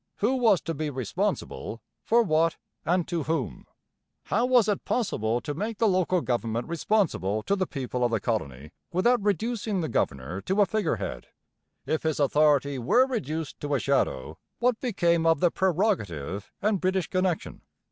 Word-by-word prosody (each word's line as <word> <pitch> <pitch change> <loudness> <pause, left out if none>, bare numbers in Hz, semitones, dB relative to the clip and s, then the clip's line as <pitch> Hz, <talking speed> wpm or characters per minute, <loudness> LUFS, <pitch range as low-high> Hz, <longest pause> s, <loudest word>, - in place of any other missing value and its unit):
Who 225 +6 +1
was 225 -7 +4
to 165 - -3
be 155 0 -3
'responsible'? 125 -2 -3 0.2
for 235 +1 +4
what? 165 -3 +2 0.3
and 175 0 +1
to 170 -2 -1
whom? 145 - -3 0.6
How 235 +5 +1
was 245 -4 +4
it 205 -2 0
possible 120 - 0
to 145 - -4
make 210 +7 -3
the 225 - +3
local 185 -2 +2
government 115 -2 -2
'responsible' 165 - 0
to 200 - +1
the 190 -2 -1
people 125 -3 -3
of 120 - +3
the 115 -2 0
colony 75 - -3 0.2
without 235 +7 +3
reducing 210 0 -1
the 160 - -1
governor 70 +9 -2
to 190 - -1
a 205 - +6
figurehead? 205 - -2 0.6
If 160 - 0
his 160 -2 -1
authority 145 -1 +3
were 240 - +4
reduced 165 - -4
to 145 -1 -1
a - - +1
shadow, 125 - 0 0.2
what 245 -1 +1
became 170 -9 +1
of 165 -2 +4
the 175 +1 +3
'prerogative' 105 - -1
and 205 -2 +1
British 185 -2 +1
connection? 185 -3 -1
165 Hz, 165 wpm, -27 LUFS, 130-205 Hz, 0.6 s, a